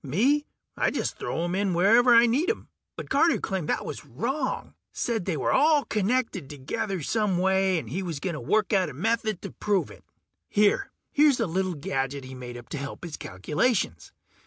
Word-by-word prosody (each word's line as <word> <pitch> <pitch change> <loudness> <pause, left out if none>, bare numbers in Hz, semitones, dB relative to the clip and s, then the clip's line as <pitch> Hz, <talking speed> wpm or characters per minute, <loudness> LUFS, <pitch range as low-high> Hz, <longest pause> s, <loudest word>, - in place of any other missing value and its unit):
Me, 255 - +2 0.3
I - - +2
just - - -3
throw 165 - -2
'em 175 +1 -2
in 190 -2 0
wherever 230 +7 +6
I 230 +1 +8
need 275 - +1
'em. 445 - -3 0.3
But - - -8
Carter 335 - +4
claimed 185 -5 -3
that - - 0
was 145 - -6
wrong. 260 - -3 0.2
Said 225 -6 -2
they 175 -5 -1
were - - 0
all 295 +1 +4
connected 210 - -1
together 150 +6 -3
some 210 +1 +1
way, 190 0 +2
and 155 - -4
he 165 - -3
was 170 -6 -4
gonna 165 -2 -3
work 215 - +1
out 185 -4 +3
a 135 - -10
method 220 - -1
to - - -6
prove 205 -3 0
it. - - -15 0.5
Here... 210 - +3 0.2
here's 290 -3 +4
a - - +2
little 185 +1 -1
gadget 135 -1 -2
he 130 0 -9
made 125 -1 -8
up 120 - -11
to 150 - -4
help 140 +3 -7
his 165 -3 -5
calculations. 100 - -1
190 Hz, 195 wpm, -26 LUFS, 150-230 Hz, 0.5 s, I